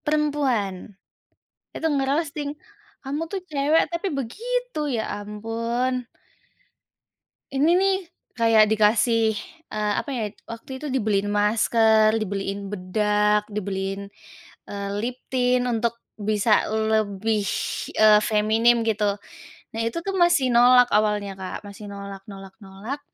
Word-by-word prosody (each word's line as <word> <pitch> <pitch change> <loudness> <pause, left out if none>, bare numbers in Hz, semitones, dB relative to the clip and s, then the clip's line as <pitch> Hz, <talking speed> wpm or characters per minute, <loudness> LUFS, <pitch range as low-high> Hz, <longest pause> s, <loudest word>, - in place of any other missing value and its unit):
Perempuan. 265 - -1 0.8
Itu 320 - -2
nge-roasting, 285 +1 -1 0.5
"Kamu 285 +3 -3
tuh 390 - -3
cewek 295 +2 +3
tapi 340 +4 -2
begitu. - - -3 0.2
Ya 220 - -1 0.2
ampun." 230 +4 -2 1.5
Ini 275 +3 +2
nih, 385 +1 +3 0.4
kayak 225 -1 +6
dikasih, 220 +1 +3 0.4
eee, 210 -1 0
apa - - -6
ya, 235 - -2 0.2
waktu 230 +3 -8
itu 300 - -5
dibeliin 215 -7 0
masker, 220 +1 +3
dibeliin 200 -1 -3
bedak, 210 +2 +1
dibeliin, 195 -1 -3 0.6
eee, 200 0 -4 0.2
lip 245 +1 -3
tint, 250 -1 +2
untuk 235 -1 -1 0.2
bisa 210 0 +2
lebih, 220 -1 0 0.5
eee, 215 -1 +6
feminim 225 +2 +3
gitu. 210 -2 0 0.5
Nah, 225 - -4
itu 230 - -2
tu 390 - -1
masih 345 -8 +3
nolak 245 +1 +6
awalnya, 210 -1 +1
Kak, 185 - -5
masih 200 +1 -10
nolak 200 -1 -8
nolak 195 -1 -10
nolak. 205 +8 -7
220 Hz, 115 wpm, -24 LUFS, 210-255 Hz, 1.5 s, kayak